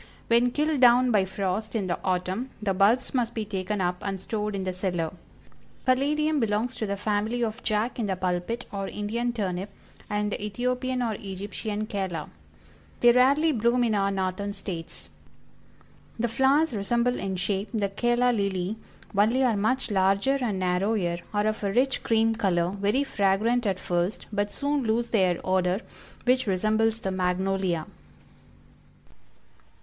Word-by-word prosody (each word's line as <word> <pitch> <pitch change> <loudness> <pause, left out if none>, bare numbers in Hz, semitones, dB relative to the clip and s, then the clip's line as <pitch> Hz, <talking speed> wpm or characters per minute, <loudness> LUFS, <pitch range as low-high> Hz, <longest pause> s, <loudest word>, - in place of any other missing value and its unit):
When 235 +1 +4
killed 300 +1 0
down 250 0 +6
by 205 -4 +3
frost 195 +3 -3
in 210 -4 0
the 175 - -2
autumn, 185 +7 -1
the 205 -2 0
bulbs 210 +7 +3
must 240 -3 0
be 220 -2 -2
taken 200 0 -3
up 180 0 0
and 195 -1 -3
stored 210 +1 -3
in 195 - -2
the 185 -1 -2
cellar. 180 -3 -2 0.7
The 255 - +6
Caladium 300 +3 +1
belongs 225 +1 0
to 220 - -2
the 200 0 -2
family 215 +4 0
of 225 +2 -3
"Jack 220 +3 0
in 220 - 0
the 190 - 0
Pulpit," 185 +6 -2
or 195 -2 -3
Indian 230 +5 -2
Turnip, 195 -4 -3 0.4
and 210 0 -1
the - - -4
Ethiopian 250 +4 -1
or 225 -2 0
Egyptian 205 +2 -4
Calla. 190 -7 -3 0.7
They 240 - +8
rarely 275 +6 +4
bloom 240 0 +2
in 230 -2 +1
our 200 -1 +2
Northern 195 +1 -2
States. 170 -5 -7 1.1
The 235 +1 0
flowers 270 +5 +3
resemble 235 +4 0
in 190 -1 -2
shape 190 +2 -1
the 210 -4 0
Calla 240 +4 +2
Lily, 200 -2 -1 0.4
only 225 +6 +3
are 240 -4 +3
much 220 +4 0
larger 200 +8 +2
and 220 -6 -1
narrower, 180 -1 0
are 205 0 0
of 215 0 -1
a 200 - 0
rich 255 +5 +2
cream 225 0 +2
color, 180 -6 +1
very 205 +7 +1
fragrant 220 +1 +1
at 190 -2 0
first, 175 +3 -1
but 205 0 0
soon 285 0 -1
lose 235 0 0
their 185 -5 +2
odor, 185 +1 +1 0.4
which 255 -1 +2
resembles 220 +4 +1
the 190 - -2
Magnolia. 185 -2 0
210 Hz, 160 wpm, -26 LUFS, 190-240 Hz, 1.1 s, They